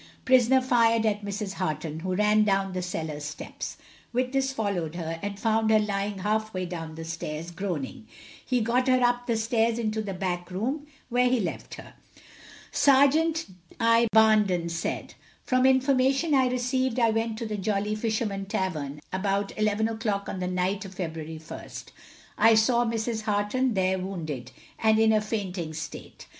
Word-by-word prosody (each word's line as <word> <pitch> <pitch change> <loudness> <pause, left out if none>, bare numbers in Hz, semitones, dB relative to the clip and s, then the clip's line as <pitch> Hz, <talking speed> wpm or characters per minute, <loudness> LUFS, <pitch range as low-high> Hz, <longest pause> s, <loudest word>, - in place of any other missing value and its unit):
Prisoner 260 0 +5
fired 230 -3 +3
at 210 -1 0
Mrs. 200 0 -4
Harton, 160 -4 -3
who 185 +2 -2
ran 210 +1 +4
down 195 -2 +1
the 185 - -2
cellar 160 -4 -4
steps. 150 0 -6 0.3
Witness 260 +2 0
followed 200 -10 -2
her, 165 -1 -4
and 200 0 -4
found 220 0 +2
her 220 - +6
lying 205 -1 -1
half 215 +2 -1
way 185 0 -1
down 165 -3 -6
the 165 0 -7
stairs, 165 0 -5
groaning. 170 - -4 0.4
He 250 -2 0
got 245 +4 +1
her 255 0 +4
up 245 0 +1
stairs 225 0 +1
into 220 -2 -1
the 200 -3 -5
back 180 -1 -3
room, 260 +11 -3 0.2
where 250 0 +3
he 250 -1 +2
left - - -4
her. - - -12 0.8
Serjeant 300 +4 +4 0.3
I. 230 0 +4
Barnden 210 -6 +4
said 165 0 -3 0.3
From 255 -1 +3
information 270 +3 +3
I 260 -2 +4
received, 255 0 0
I 230 -2 +4
went 225 0 -1
to 230 - -4
the 215 -1 -3
Jolly 205 +1 -1
Fisherman 215 -3 -2
tavern 150 -7 -3
about 195 +1 -1
11 215 0 +1
o'clock 220 -3 -2
on 190 - -4
the 180 - -2
night 185 +3 -1
of 190 -1 -10
February 160 -3 -5
1st. 155 - -9 0.5
I 225 +1 +7
saw 235 +2 +3
Mrs. 225 0 -2
Harton 210 +4 +1
there 190 0 +1
wounded, 155 -9 -5 0.3
and 220 -1 +4
in 220 0 +4
a 215 - +3
fainting 190 -7 -4
state. 155 - -8
215 Hz, 165 wpm, -27 LUFS, 185-235 Hz, 0.8 s, I